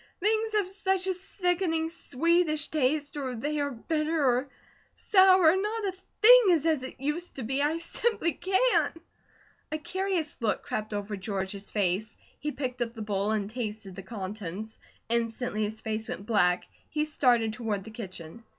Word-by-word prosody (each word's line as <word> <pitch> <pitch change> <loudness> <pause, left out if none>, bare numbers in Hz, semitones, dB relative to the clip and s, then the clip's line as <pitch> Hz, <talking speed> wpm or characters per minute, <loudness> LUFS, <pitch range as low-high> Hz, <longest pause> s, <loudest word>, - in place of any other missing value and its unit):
"Things 440 +3 +1
have 415 -3 +2
such 385 -1 0
a 380 - +1
sickening, 355 -3 -1
sweetish 330 0 +1
taste, 295 0 0
or 260 -3 -3
they 295 +6 -2
are 285 0 0
bitter, 305 +4 -1
or 255 +2 +2 0.5
sour; 375 -4 +6
not 420 +3 -1
a 390 - 0 0.3
thing - - +10
is 330 -4 +3
as 315 -4 +2
it 260 - -8
used 300 +6 -3
to 265 - -5
be. 265 +5 -1
I 300 +3 +1
simply 335 +1 0
can't!" 385 - +2 0.8
A 310 - -1
curious 370 -1 -2
look 225 -4 0
crept 215 0 -3
over 205 0 -3
George's 195 0 -4
face. 205 +1 -1 0.2
He 300 - -2
picked 255 -3 -4
up 235 0 -2
the 220 - -5
bowl 205 -1 -1
and 215 -2 0
tasted 215 -4 -5
the 195 - -6
contents. 200 +1 -6 0.3
Instantly 230 -1 0
his 220 +1 -6
face 220 0 -3
went 200 - -5
black; 180 -5 +2 0.2
he 300 0 0
started 245 -7 +2
toward 215 -4 -2
the 220 - -10
kitchen. 190 -2 -8
265 Hz, 165 wpm, -28 LUFS, 215-335 Hz, 0.8 s, thing